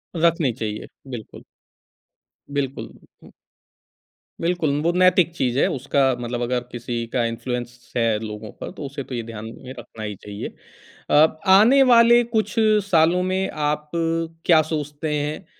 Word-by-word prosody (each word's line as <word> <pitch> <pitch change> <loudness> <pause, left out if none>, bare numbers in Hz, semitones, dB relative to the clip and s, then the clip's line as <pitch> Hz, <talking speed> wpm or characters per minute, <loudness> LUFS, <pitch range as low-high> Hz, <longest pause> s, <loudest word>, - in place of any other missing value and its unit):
रखनी 165 -5 +2
चाहिए, 105 -1 -5 0.2
बिल्कुल। 120 -5 -9 1.1
बिल्कुल। 140 -1 -3 1.5
बिल्कुल, 170 -2 0
वो 170 - +2
नैतिक 180 -1 +4
चीज़ 125 -5 0
है, - - +4
उसका 135 0 +1
मतलब 120 0 -4
अगर 125 +1 0
किसी 120 -1 -4
का 120 - +1
इन्फ्लुएंस 120 +1 -5
है 115 -2 +2
लोगों 105 -1 -7
पर - - -5
तो 145 - -6
उसे 140 0 -6
तो 125 - -7
ये 115 - -3
ध्यान 110 -1 -8 0.2
में 130 0 -8
रखना 115 -2 -10
ही 105 -1 -4
चाहिए। 105 +2 -7 0.6
अ, 155 +1 +4
आने 220 +9 +7
वाले 235 0 +7
कुछ 220 +1 0 0.4
सालों 170 +1 +4
में 190 +1 -1 0.2
आप 150 0 -2 0.6
क्या 160 -3 +6
सोचते 150 0 -3
हैं 150 +5 -4
140 Hz, 140 wpm, -22 LUFS, 120-170 Hz, 1.5 s, आने